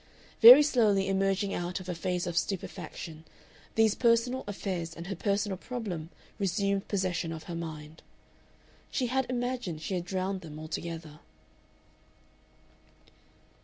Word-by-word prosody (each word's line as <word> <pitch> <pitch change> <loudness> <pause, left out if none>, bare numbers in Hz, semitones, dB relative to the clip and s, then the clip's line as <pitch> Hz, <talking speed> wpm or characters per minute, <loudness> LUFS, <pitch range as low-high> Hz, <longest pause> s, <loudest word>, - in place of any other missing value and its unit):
Very 250 +6 +12
slowly 215 -9 +3
emerging 195 +1 +1
out 175 +2 -3
of 185 - -10
a 180 - -2
phase 180 +1 -2
of 175 -1 -4
stupefaction, 165 -3 -4 0.5
these 220 -2 +4
personal 240 +2 +2
affairs 185 -5 -4
and 170 - -8
her 195 +2 -4
personal 200 0 -1
problem 195 -11 -5 0.3
resumed 200 +1 0
possession 185 -4 -1
of 160 -1 -6
her 175 - -7
mind. 160 -2 -7 0.9
She 255 - -1
had 260 +1 0
imagined 245 -10 -3
she 195 - -3
had 175 -2 -2
drowned 190 +1 -2
them 155 -3 -9
altogether. 155 -1 -6
190 Hz, 130 wpm, -29 LUFS, 170-215 Hz, 0.9 s, Very